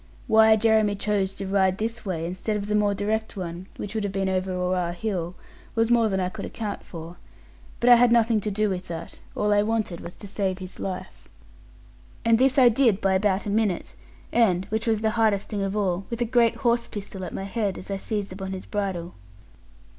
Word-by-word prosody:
Why 220 0 +6
Jeremy 220 -1 +3
chose 195 -1 -1
to 195 - -5
ride 190 -1 +2
this 230 +2 -3
way, 170 -5 -3
instead 185 +5 -2
of 200 - -4
the 210 - -2
more 205 -1 +2
direct 215 +2 -2
one 175 0 -5
(which 205 - -5
would 220 -2 -1
have 200 - -2
been 195 0 -1
over 185 0 -1
Oare 180 -1 -1
hill), 180 -3 -3 0.4
was 225 +1 +2
more 230 -2 +4
than 190 -1 0
I 180 - 0
could 185 - -6
account 215 -3 -5
for: 170 0 -9 0.6
but 240 - 0
I 245 -1 +9
had 245 0 +5
nothing 230 -2 +4
to 210 - -2
do 215 +1 +1
with 185 -1 -3
that; 165 -1 -7 0.2
all 210 0 +2
I 205 - +4
wanted 215 -5 -1
was 175 - -8
to 205 - -9
save 195 -2 -1
his 185 -1 -9
life. 185 -2 -6 1.0
And 230 0 +4
this 265 +1 +3
I 255 -2 +8
did 230 -4 +3
by 195 -2 +2
about 190 0 +1
a 205 - -2
minute; 210 -4 0 0.4
and 190 -6 +3
(which 220 +2 -2
was 220 -2 +2
the 220 0 +2
hardest 205 -3 +2
thing 205 -2 -2
of 195 +1 -1
all) 190 -2 -1
with 235 - -4
a 240 - +1
great 235 -1 +3
horse 235 0 +1
pistol 195 -2 -7
at 180 - -5
my - - -4
head 200 -1 -2
as 190 - -8
I 195 - -1
seized 205 -1 -3
upon 190 0 -5
his 185 - -6
bridle. 190 -4 -3
205 Hz, 220 wpm, -25 LUFS, 190-220 Hz, 1.0 s, I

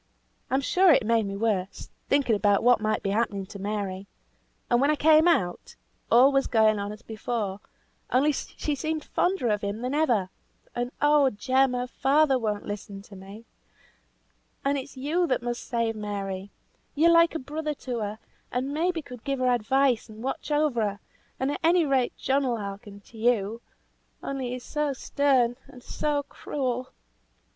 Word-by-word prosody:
I'm 265 +1 +1
sure 365 +6 +4
it 260 - +4
made 225 -2 +2
me 195 0 -4
worse, 200 -3 -2 0.2
thinking 275 -5 +3
about 205 -1 +2
what 245 -2 +5
might 215 0 -1
be 195 - 0
happening 205 -2 -1
to 200 +1 -10
Mary. 200 -1 -4 0.6
And 240 0 +2
when 280 - +3
I 305 - +3
came 310 +2 +5
out, 340 - 0 0.3
all 255 +4 +6
was 275 0 +2
going 220 -2 +3
on 200 0 -3
as 210 +2 -11
before, 215 -3 -3 0.5
only 280 +4 +3
she 295 +1 -4
seemed 310 +2 -3
fonder 360 -10 0
of 210 -1 0
him 205 +2 -3
than 250 +2 -2
ever; 235 -12 +1 0.4
and 245 +1 -3
oh 295 -2 +5
Jem! 260 +4 +1
her 250 0 -1
father 270 +1 +2
won't 210 -3 -2
listen 200 -1 -7
to 200 - -14
me, 195 +4 -11 1.2
and 280 +1 +2
it's 270 0 -6
you 320 +7 0
must 240 0 -5
save 230 -2 -1
Mary! 200 -2 -4 0.5
You're 330 +3 +5
like 335 0 +5
a - - -1
brother 300 +3 -4
to 245 -2 -2
her, 210 0 -4 0.3
and 260 +3 -2
maybe 330 +1 0
could 250 -4 -11
give 275 0 -1
her 255 -1 +2
advice 245 +1 +1
and 215 +1 -10
watch 270 - -4
over 295 -5 +1
her, 205 -1 -2 0.4
and 265 +2 0
at - - -4
any 335 0 +4
rate 265 -3 +1
John 275 0 +1
will 240 -2 0
hearken 200 0 -8
to 225 +2 -15
you; 225 -1 +1 0.6
only 270 -2 -3
he's 250 0 -5
so 300 -2 -1
stern 260 -3 +1
and 250 - -14
so 295 -1 -1
cruel." 255 -3 -4
245 Hz, 175 wpm, -26 LUFS, 210-280 Hz, 1.2 s, all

